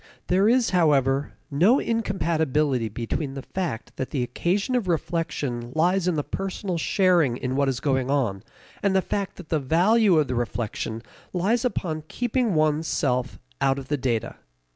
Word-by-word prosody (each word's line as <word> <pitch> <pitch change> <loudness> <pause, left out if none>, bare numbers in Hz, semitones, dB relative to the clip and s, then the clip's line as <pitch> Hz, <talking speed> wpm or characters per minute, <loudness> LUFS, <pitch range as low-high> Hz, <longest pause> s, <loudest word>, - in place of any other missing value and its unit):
There 190 +4 +4
is, 245 0 +3
however, 140 -6 +2 0.2
no 185 - +4
incompatibility 155 - 0
between 120 +6 -3
the 135 - -6
fact 175 -12 -4
that 130 - -3
the 135 -5 -1
occasion 180 - -1
of 240 -6 0
reflection 150 -8 -2
lies 180 +3 +2
in 175 -3 +1
a 145 - 0
personal 190 -1 -3
sharing 170 -9 +3
in 130 0 -3
what 140 0 +2
is 130 -2 -2
going 130 -2 0
on 120 -9 0 0.4
and 200 -1 +1
the 190 - +3
fact 200 -2 -3
that 180 -4 -12
the 160 - +1
value 180 - +4
of 150 -3 +3
the 125 - -2
reflection 115 -1 -3 0.3
lies 205 +7 +1
upon 170 -10 -2
keeping 240 -2 0
one's 155 +1 +2
self 125 -3 -1 0.2
out 135 0 +2
of 135 -1 -7
the 145 - +1
data. 120 -4 -2
155 Hz, 165 wpm, -25 LUFS, 130-190 Hz, 0.4 s, There